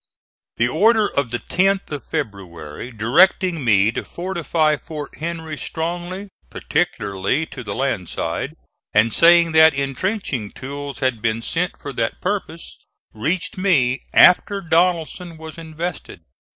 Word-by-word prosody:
The 115 Hz, -, +3 dB
order 215 Hz, -, +3 dB
of 140 Hz, -4 st, -1 dB
the 120 Hz, -, -2 dB
10th 195 Hz, +7 st, 0 dB
of 145 Hz, -5 st, -5 dB
February 100 Hz, -, -6 dB
directing 160 Hz, -, +3 dB
me 105 Hz, -2 st, +4 dB
to -, -, -4 dB
fortify 170 Hz, -4 st, 0 dB
Fort 150 Hz, -1 st, -8 dB
Henry 160 Hz, -1 st, -5 dB
strongly, 175 Hz, +4 st, -4 dB, 0.2 s
particularly 100 Hz, +9 st, -1 dB
to 130 Hz, -5 st, -9 dB
the -, -, -5 dB
land 130 Hz, -10 st, -1 dB
side, -, -, -3 dB, 0.4 s
and 105 Hz, +1 st, +4 dB
saying 170 Hz, 0 st, +6 dB
that 160 Hz, -1 st, +6 dB
intrenching 140 Hz, -, -2 dB
tools 140 Hz, +1 st, -7 dB
had 125 Hz, -4 st, 0 dB
been 115 Hz, 0 st, -1 dB
sent 170 Hz, +9 st, -2 dB
for 140 Hz, -, -7 dB
that 115 Hz, -2 st, -2 dB
purpose, 185 Hz, -4 st, -4 dB, 0.3 s
reached 170 Hz, -, -2 dB
me 135 Hz, -10 st, +2 dB
after 200 Hz, +3 st, +5 dB
Donelson 170 Hz, -1 st, 0 dB
was 160 Hz, +1 st, -10 dB
invested. 160 Hz, -, -6 dB
155 Hz, 130 wpm, -21 LUFS, 120-175 Hz, 0.4 s, saying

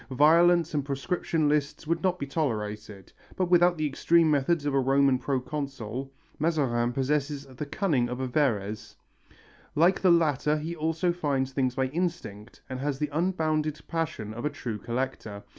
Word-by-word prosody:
Violence 165 Hz, +5 st, +4 dB
and 145 Hz, -2 st, 0 dB
proscription 145 Hz, +3 st, -1 dB
lists 150 Hz, +1 st, 0 dB
would 165 Hz, +2 st, -1 dB
not 185 Hz, -1 st, +1 dB
be 140 Hz, -, -4 dB
tolerated, 105 Hz, -, -4 dB, 0.2 s
but 180 Hz, -1 st, -1 dB
without 175 Hz, 0 st, +5 dB
the 155 Hz, -, -1 dB
extreme 160 Hz, +3 st, +3 dB
methods 145 Hz, +2 st, +1 dB
of 145 Hz, -, 0 dB
a 135 Hz, -, +3 dB
Roman 135 Hz, 0 st, +3 dB
proconsul, 135 Hz, -2 st, -4 dB, 0.3 s
Mazarin 135 Hz, -7 st, +1 dB
possesses 140 Hz, +2 st, -1 dB
the 135 Hz, +2 st, -7 dB
cunning 140 Hz, -, 0 dB
of 125 Hz, +1 st, -4 dB
a 130 Hz, -, -1 dB
Verres. 110 Hz, -6 st, -1 dB, 0.8 s
Like 170 Hz, +5 st, +3 dB
the 185 Hz, -, +4 dB
latter 150 Hz, -3 st, +3 dB
he 160 Hz, +3 st, -4 dB
also 165 Hz, +2 st, 0 dB
finds 140 Hz, -6 st, -1 dB
things 130 Hz, -2 st, 0 dB
by 130 Hz, -, +1 dB
instinct 130 Hz, -, -4 dB
and 130 Hz, 0 st, -5 dB
has 140 Hz, 0 st, -2 dB
the 150 Hz, +1 st, -2 dB
unbounded 155 Hz, -3 st, 0 dB
passion 155 Hz, -10 st, -3 dB
of 120 Hz, +2 st, -7 dB
a 150 Hz, -, +1 dB
true 120 Hz, -7 st, -5 dB
collector. 115 Hz, -3 st, -4 dB
145 Hz, 160 wpm, -27 LUFS, 130-160 Hz, 0.8 s, without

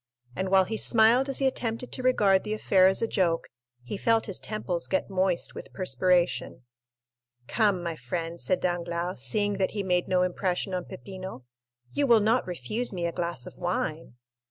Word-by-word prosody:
And 190 Hz, +1 st, -2 dB
while 190 Hz, 0 st, +5 dB
he 220 Hz, +4 st, -3 dB
smiled 235 Hz, +5 st, +4 dB
as 270 Hz, -, -2 dB
he 275 Hz, -, +1 dB
attempted 245 Hz, -2 st, -1 dB
to 255 Hz, -, -4 dB
regard 205 Hz, -7 st, +3 dB
the 215 Hz, 0 st, -2 dB
affair 190 Hz, -3 st, +4 dB
as 190 Hz, +4 st, +1 dB
a -, -, +2 dB
joke, 170 Hz, -6 st, 0 dB, 0.3 s
he 125 Hz, -, -5 dB
felt 225 Hz, +2 st, +2 dB
his 195 Hz, -, -3 dB
temples 185 Hz, -5 st, -3 dB
get 190 Hz, +1 st, -1 dB
moist 185 Hz, -2 st, 0 dB
with -, -, -9 dB
perspiration. 170 Hz, -6 st, +1 dB, 0.8 s
"Come, 205 Hz, -6 st, +1 dB
my 170 Hz, -1 st, -3 dB
friend," 170 Hz, +1 st, -5 dB
said 185 Hz, -, 0 dB
Danglars, 175 Hz, 0 st, -2 dB
seeing 205 Hz, -2 st, -1 dB
that 190 Hz, -, +1 dB
he 200 Hz, -, 0 dB
made 180 Hz, -2 st, +1 dB
no 180 Hz, -1 st, +2 dB
impression 180 Hz, +1 st, -1 dB
on 180 Hz, -1 st, -2 dB
Peppino, 185 Hz, -7 st, -9 dB, 0.5 s
"you 285 Hz, -1 st, +1 dB
will 235 Hz, -3 st, +6 dB
not 220 Hz, +3 st, +2 dB
refuse 180 Hz, -, -3 dB
me 175 Hz, -3 st, -3 dB
a 170 Hz, -, 0 dB
glass 170 Hz, -8 st, -4 dB
of -, -, -10 dB
wine?" 165 Hz, -6 st, -3 dB
185 Hz, 180 wpm, -27 LUFS, 175-215 Hz, 0.8 s, will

